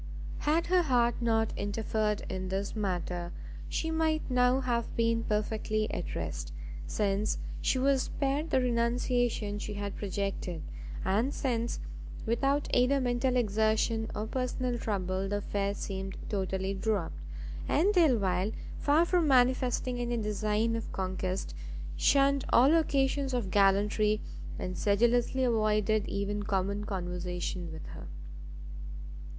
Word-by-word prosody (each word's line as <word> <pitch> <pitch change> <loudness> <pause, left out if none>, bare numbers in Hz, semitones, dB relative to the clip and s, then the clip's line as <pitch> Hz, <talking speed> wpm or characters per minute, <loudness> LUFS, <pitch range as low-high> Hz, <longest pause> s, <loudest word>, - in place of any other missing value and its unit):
Had 320 +3 +2
her 365 +1 +4
heart 245 -6 +2
not 225 -1 +2
interfered 210 +1 -1
in 185 0 -4
this 195 +3 -2
matter, 180 -4 -2 0.4
she 320 - -1
might 315 -3 0
now 250 +1 +4
have 240 -3 -1
been 230 0 +2
perfectly 215 0 0
at - - -4
rest, - - -4 0.4
since 205 0 0 0.2
she - - +2
was 270 0 +3
spared 285 +5 -1
the - - +3
renunciation 235 -3 +1
she 210 0 -5
had 200 -1 -4
projected, 195 -4 -3 0.4
and 220 +9 +1
since, 235 -3 -1 0.5
without 275 +5 +1
either 250 +3 +4
mental 250 0 +1
exertion 220 0 +1
or 210 - -2
personal 250 +1 -1
trouble, 190 -3 -1
the 205 - 0
affair 200 0 -1
seemed 190 -1 -5
totally 190 -1 -1
dropt, 195 - -1 0.5
and 375 +8 +3
Delvile, 215 - +3 0.3
far 300 +4 +4
from 345 -2 +2
manifesting 255 -1 +3
any 240 0 -1
design 210 +1 0
of 225 - -4
conquest, 185 - -2 0.4
shunned 275 - +4
all 265 +6 +6
occasions 275 -4 +2
of 215 -6 -2
gallantry, 205 +2 +3 0.4
and 185 0 -4
sedulously 240 +5 +2
avoided 215 -2 +2
even 200 +1 -2
common 200 0 -1
conversation 180 -2 -3
with 160 0 -8
her. - - -9
220 Hz, 125 wpm, -30 LUFS, 200-250 Hz, 0.5 s, all